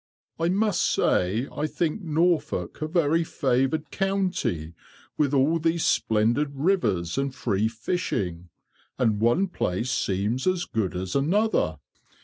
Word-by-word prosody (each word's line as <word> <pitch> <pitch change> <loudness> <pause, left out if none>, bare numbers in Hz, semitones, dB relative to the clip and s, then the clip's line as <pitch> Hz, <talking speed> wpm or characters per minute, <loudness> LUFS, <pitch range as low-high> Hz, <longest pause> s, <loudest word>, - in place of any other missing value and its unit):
"I 165 +1 +1
must 200 0 +1
say 105 +9 +1
I 150 - -1
think 165 +5 -2
Norfolk 165 -1 0
a 155 - -1
very 165 0 +2
favoured 135 +1 0
county, 185 - -1 0.4
with 145 -3 +1
all 145 +4 +3
these 165 +1 +1
splendid 115 +7 +2
rivers 120 - 0
and 135 -1 -2
free 105 -2 0
fishing; 105 - -3 0.5
and 110 -4 +1
one 120 +12 +3
place 120 - -2
seems 105 - -1
as 185 -1 +1
good 105 -6 -2
as 90 0 -4
another." 155 - +1
140 Hz, 125 wpm, -25 LUFS, 110-170 Hz, 0.5 s, all